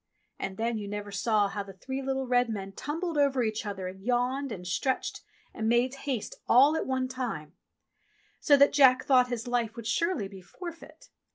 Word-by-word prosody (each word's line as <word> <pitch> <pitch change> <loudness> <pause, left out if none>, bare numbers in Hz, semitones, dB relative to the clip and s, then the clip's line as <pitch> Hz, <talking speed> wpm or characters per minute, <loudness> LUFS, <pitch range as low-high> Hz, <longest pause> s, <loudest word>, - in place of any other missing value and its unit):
And 195 0 -4
then 230 0 -1
you 205 - -6
never 205 0 -5
saw 205 +1 +2
how 200 +1 -4
the 195 -1 -9
three 265 +8 -5
little 265 0 -2
red 245 -1 +2
men 195 -3 -4
tumbled 315 - -3
over 275 -3 +3
each 220 -1 -2
other 190 -2 -4
and 190 +1 -9
yawned 250 +4 0
and 180 -4 -6
stretched 260 +9 -1 0.3
and 220 0 -1
made 240 +2 +3
haste 270 -5 -4 0.2
all 275 +6 +6
at - - -2
one 260 -1 0
time, 230 - -5 0.9
so 285 - +5
that 280 +1 +5
Jack 260 -3 +6
thought 255 -2 +5
his 245 -2 -4
life 235 -2 -1
would 235 -2 -8
surely 315 - 0
be 195 -1 -11
forfeit. 335 - -11
245 Hz, 190 wpm, -29 LUFS, 205-270 Hz, 0.9 s, all